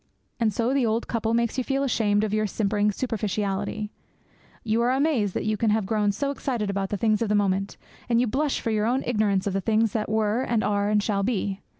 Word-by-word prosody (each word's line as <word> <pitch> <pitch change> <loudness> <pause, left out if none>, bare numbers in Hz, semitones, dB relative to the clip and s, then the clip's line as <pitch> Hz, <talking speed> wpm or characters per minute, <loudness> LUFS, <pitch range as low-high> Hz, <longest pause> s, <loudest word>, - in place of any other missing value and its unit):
And 225 -2 +2
so 235 +5 0
the 275 -2 +2
old 225 0 0
couple 230 -1 0
make 235 -1 0
you - - 0
feel 275 +2 0
ashamed 215 -5 +1
of 215 -1 -1
your 215 0 +1
simpering 210 +1 +1
superficiality; 210 -2 -2 0.7
you 225 +1 +1
are 240 - +2
amazed 260 - +1
that - - -2
you 215 0 0
can 225 +1 +1
have 215 -1 +1
grown 210 0 +1
so 275 +8 -2
excited 240 -7 -2
about 195 -1 -2
the 205 - -2
things 215 0 +1
of 225 - 0
a - - +3
moment; 195 -1 0 0.3
and 235 -1 +3
you 250 - +3
blush 275 +5 -1
for 225 - -1
your 215 0 +1
own 255 +3 +1
ignorance 210 -5 +1
of 200 - -1
the 195 - 0
things 220 +1 +2
that 215 -2 -2
were 215 +2 +1
and 230 -4 0
are 205 0 +1
and 210 -1 +2
shall 200 -2 0
be. 200 -2 -1
215 Hz, 235 wpm, -25 LUFS, 205-235 Hz, 0.7 s, a